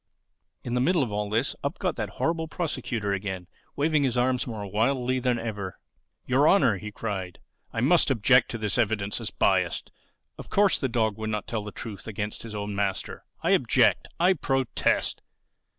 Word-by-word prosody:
In 120 - -4
the 125 - +2
middle 170 +2 +3
of 120 - -4
all 105 0 -2
this 115 +6 0
up 140 +4 -2
got 180 -5 -1
that 105 -3 -3
horrible 165 0 0
Prosecutor 125 - -2
again, 95 -2 -3 0.3
waving 155 +1 +2
his 130 -3 +1
arms 125 0 +1
more 110 -4 -5
wildly 125 +5 +1
than 125 -1 +1
ever. 105 -5 -5 0.5
"Your 135 +4 +3
Honor," 125 - +4
he 105 +3 -7
cried, 95 -5 -4 0.3
"I 115 - -2
must 155 +6 +4
object 125 0 +4
to 115 - -3
this 110 +1 0
evidence 105 -3 0
as - - -3
biased. - - +1 0.5
Of - - -9
course 200 -2 +3
the 135 - 0
dog 110 -3 0
would 110 0 -3
not 105 -1 -2
tell 110 -2 -3
the 105 - -7
truth 105 -2 -8
against 105 -1 -4
his 110 -2 -7
own 105 0 -3
master. 100 -1 -2 0.2
I - - +2
object. - - +3
I 180 +3 +5
protest." 135 -6 0
115 Hz, 180 wpm, -27 LUFS, 105-135 Hz, 0.5 s, I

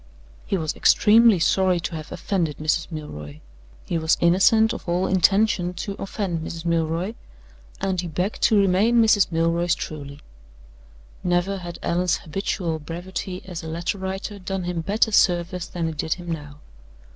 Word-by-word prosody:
"He 195 - 0
was 155 -3 -2
extremely 225 -1 +5
sorry 185 +1 +2
to 170 - -4
have 155 -1 -8
offended 170 -7 -2
Mrs. 155 +3 -1
Milroy. 75 - -7 0.5
He 165 - -1
was 160 0 +2
innocent 220 +6 +4
of - - -7
all 180 +2 +1
intention 190 -1 +2
to 200 +3 -4
offend 195 -4 -3
Mrs. 165 +1 -6
Milroy. 170 +4 0 0.7
And 190 -2 -1
he 175 - -5
begged 180 +6 -3
to 220 - +4
remain 200 +5 +3
Mrs. 215 -5 +4
Milroy's 170 +1 +1
truly." 145 -2 -7 1.0
Never 175 +2 +1
had 175 -1 -7
Allan's 175 0 +1
habitual 170 -1 -3
brevity 180 +4 -6
as 180 -3 -6
a 160 - -8
letter 170 +4 -3
writer 190 +2 -5
done 190 0 -4
him 175 -1 -2
better 210 +6 +1
service 180 -2 +2
than 170 -2 -3
it 160 -2 -5
did 160 - -1
him 175 -2 -7
now. 150 -2 -7
175 Hz, 155 wpm, -23 LUFS, 165-195 Hz, 1.0 s, extremely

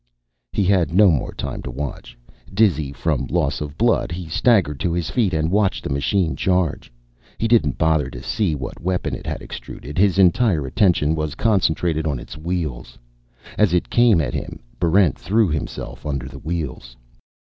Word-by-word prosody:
He 100 - 0
had 90 -3 +2
no 100 -1 +7
more 75 - -1
time - - -5
to 65 - -7
watch. 65 -2 -6 0.3
Dizzy 90 -9 +2
from - - -1
loss 75 -6 0
of 75 0 -6
blood, 115 -5 +2
he 85 0 -5
staggered 85 - +2
to 85 - -1
his 85 -1 -2
feet 115 -7 +1
and 80 0 0
watched 100 -1 +1
the - - -4
machine 80 +5 0
charge. 90 -8 0 0.5
He 115 - 0
didn't 110 - +3
bother 80 -4 +2
to - - -9
see 105 -8 0
what 65 -3 -7
weapon 90 +1 -1
it - - -6
had - - -4
extruded; 75 +5 -8
his 100 -2 +3
entire 95 - +3
attention 80 +1 +2
was 75 -1 -3
concentrated 85 -6 +1
on 70 -3 -1
its - - -9
wheels. 75 -7 -4 0.6
As 100 -5 +4
it 90 - -1
came 120 -6 +5
at 65 -4 -3
him, - - -5 0.2
Barrent 85 -2 +3
threw 110 0 +2
himself 75 -1 -5
under 70 -3 -3
the - - -10
wheels. 70 -7 -5
85 Hz, 175 wpm, -21 LUFS, 75-95 Hz, 0.6 s, no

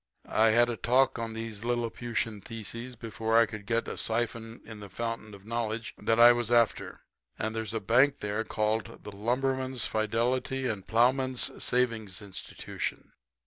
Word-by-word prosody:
I 110 +1 +4
had 120 +2 +5
a 120 -1 -3
talk 125 +1 +2
on 115 -1 -4
these 110 -2 -5
liliputian 115 -2 -2
thesises 115 +3 -7
before 115 -1 0
I 115 - +7
could 105 -1 -9
get 115 0 0
a - - -5
siphon 115 0 -1
in 110 -2 -9
the 100 -1 -9
fountain 115 0 -4
of 100 0 -16
knowledge 115 -1 -3
that 115 0 0
I 120 +1 +10
was 120 -1 0
after. 120 -2 +2 0.4
And 110 +1 -3
there's 110 -1 -3
a - - +1
bank 125 +7 +3
there 105 +2 -2
called 110 +1 -2
the 105 - -7
Lumberman's 130 +3 -1
Fidelity 125 +5 0
and 105 -6 -3
Plowman's 130 +2 +2
Savings 115 -6 0
Institution. 100 -3 -6
115 Hz, 160 wpm, -29 LUFS, 110-120 Hz, 0.4 s, I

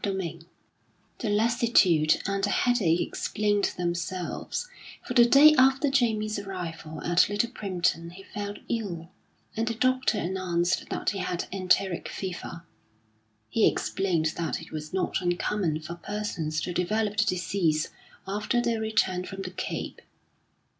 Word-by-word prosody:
XVIII 175 -4 -3 0.7
The 220 - -2
lassitude 205 -8 +3
and 195 0 -1
the 205 - +2
headache 200 -9 +2
explained 205 -1 0
themselves, 175 - -3 0.4
for - - -3
the 240 -2 +7
day 290 +5 +8
after 270 +2 +4
Jamie's 215 -5 +1
arrival 165 -5 -6
at 175 +2 +4
Little 210 +3 0
Primpton 175 -5 -1
he 195 +2 -11
fell 205 0 -5
ill, 180 -7 -3 0.4
and 225 +1 -1
the 230 - -1
doctor 255 -1 +2
announced 175 0 -1
that - - -1
he 200 - -4
had 175 -2 -2
enteric 185 -1 +1
fever. 175 -3 -6 0.8
He 225 - +3
explained 170 -5 0
that 170 - -2
it - - -12
was 155 -1 -6
not 190 0 -1
uncommon 175 -2 0
for 155 +2 -6
persons 170 -5 -3
to 180 - -3
develop 210 +4 0
the 215 - +4
disease 175 -4 0 0.4
after 210 +5 0
their 235 -2 0
return 220 -5 +1
from 195 +1 -6
the 185 - -5
Cape. 185 - -5
195 Hz, 140 wpm, -27 LUFS, 175-215 Hz, 0.8 s, day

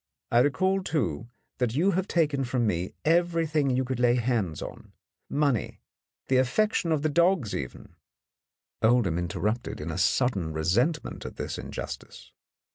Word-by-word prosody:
I 120 - +5
recall, 185 +9 +2
too, 120 - -2 0.3
that 125 -2 0
you 180 +7 +3
have 190 +2 -1
taken 150 -5 +1
from 125 -2 0
me 90 -3 -1
everything 165 -3 +2
you 130 0 +1
could 130 -1 -3
lay 120 0 +4
hands 115 - 0
on, - - -9 0.4
money, 140 -5 0 0.5
the 130 - +3
affection 165 - +1
of 155 -2 +1
the - - +3
dogs 170 - +2
even 65 -3 -6 0.5
" - - -62
Oldham 110 -7 +3
interrupted 105 +7 -2
in 80 +1 -4
sudden 95 -9 +1
resentment 110 - 0
at - - -7
this - - -4
injustice. - - -7
130 Hz, 145 wpm, -27 LUFS, 110-160 Hz, 0.5 s, I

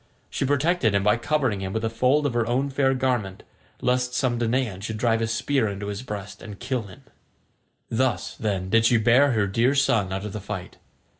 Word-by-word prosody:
She - - -1
protected 145 - +2
him 100 - +2
by 105 +3 +3
covering 130 -5 0
him 95 0 -4
with 110 0 -1
a - - 0
fold 130 +6 +2
of 140 - 0
her 120 -1 0
own 135 +4 0
fair 135 0 +2
garment, 125 -7 -1 0.4
lest 125 0 0
some 125 -3 0
Danaan 115 -4 -1
should 110 +1 -4
drive 115 0 +1
a 115 - 0
spear 115 +2 0
into 100 0 -5
his 100 +2 -4
breast 105 -5 -7
and 105 -2 -9
kill 125 -5 -3
him. 95 - -14 0.8
Thus, 130 +2 -1
then, 95 -4 -2
did 115 0 +4
she 120 - +4
bear 125 +5 +4
her 105 -3 +2
dear 115 +7 +1
son 110 -8 +2
out 95 +2 -3
of 105 - -6
the 105 - -5
fight. 95 -2 -7
115 Hz, 210 wpm, -24 LUFS, 105-130 Hz, 0.8 s, did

